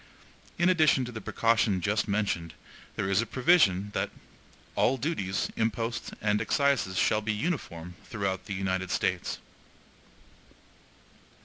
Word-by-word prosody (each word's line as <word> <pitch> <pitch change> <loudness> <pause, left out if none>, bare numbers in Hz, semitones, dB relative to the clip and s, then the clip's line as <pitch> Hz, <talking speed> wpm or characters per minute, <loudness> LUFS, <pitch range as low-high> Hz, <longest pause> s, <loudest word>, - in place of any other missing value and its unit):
In 175 - +3
addition 155 -7 +4
to 120 - -7
the 110 -2 -7
precaution 110 -3 +2
just 105 +5 0
mentioned, 100 -6 -1 0.4
there - - -1
is 100 +2 +3
a 115 - -4
provision 115 - +3
that - - -1 0.6
"all 130 - +2
duties, 105 - -1
imposts, 115 +1 -1
and 105 0 +2
excises 140 -10 +1
shall 105 +4 +3
be 110 0 -1
UNIFORM 105 - -3
throughout 95 -3 -3
the 100 - -4
United 95 -1 -1
States." - - -1
105 Hz, 125 wpm, -28 LUFS, 95-125 Hz, 0.6 s, addition